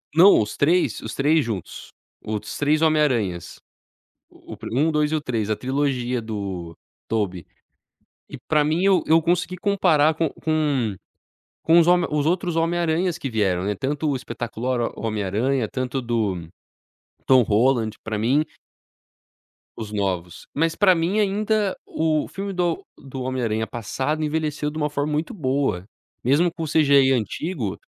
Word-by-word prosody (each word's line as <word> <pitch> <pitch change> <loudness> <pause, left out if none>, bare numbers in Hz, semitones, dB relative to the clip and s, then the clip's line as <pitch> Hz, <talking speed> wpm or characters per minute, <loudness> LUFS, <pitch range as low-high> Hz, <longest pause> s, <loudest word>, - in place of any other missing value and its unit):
não 185 +5 +7
os 105 0 -4
3, 170 +5 +2
os - - -6
3 150 +3 +3
juntos, 105 -7 -6 0.3
os 105 -1 -4
3 150 +2 +2
Homem 155 -1 +4
Aranhas. 105 - -1 0.7
O - - -12
pri - - -8
o 115 - -3
1, 155 +3 +3
o - - 0
2, 150 -1 +1
e - - +2
o - - -1
3, 115 -7 -2
a 110 - +1
trilogia 130 -2 -1
do 100 -6 -5 0.3
Tobey. 100 -6 -2 0.8
E - - -9
pra 155 -1 +3
mim, 160 +5 +1
eu 190 -4 +4
eu 160 +1 +5
consegui 180 +2 0
comparar 175 -6 +3
co 160 -1 0
com, 145 -8 0 0.7
com 165 +1 +5
os 170 - +5
home 175 0 +4
com 150 - -1
os 145 - 0
outros 175 0 0
Homem 165 +1 +1
Aranhas 170 +1 0
que 135 - -4
vieram, 95 -5 +1
né, 105 +1 -1
tanto 145 +6 -2
o 140 - 0
Espetacular 120 0 -3
Homem 110 -2 -2
Aranha, 110 +5 0
tanto 130 +1 -3
do 105 -8 -2 0.8
Tom 130 -1 +6
Holland, 110 0 +1
pra 110 -1 -3
mim 135 +8 +2 1.3
Os 110 -2 -6
novos. 95 -4 -3
Mas 165 +2 0
pra 195 -3 +5
mim, 175 +6 0
ainda 210 0 +1
o 155 -1 0
filme 195 +1 -5
do 175 -2 -1
do 135 -1 -8
Homem 130 0 -2
Aranha 110 -1 0
passado, 135 +7 -3
envelheceu 150 -1 -1
de 150 - -8
uma 150 -1 0
forma 150 +1 -2
muito 155 +9 -2
boa. 135 - -1 0.4
Mesmo 150 +8 +3
com 165 - -5
o - - -3
CGI 140 -3 +4
antigo 125 - -2
140 Hz, 170 wpm, -23 LUFS, 115-160 Hz, 1.3 s, não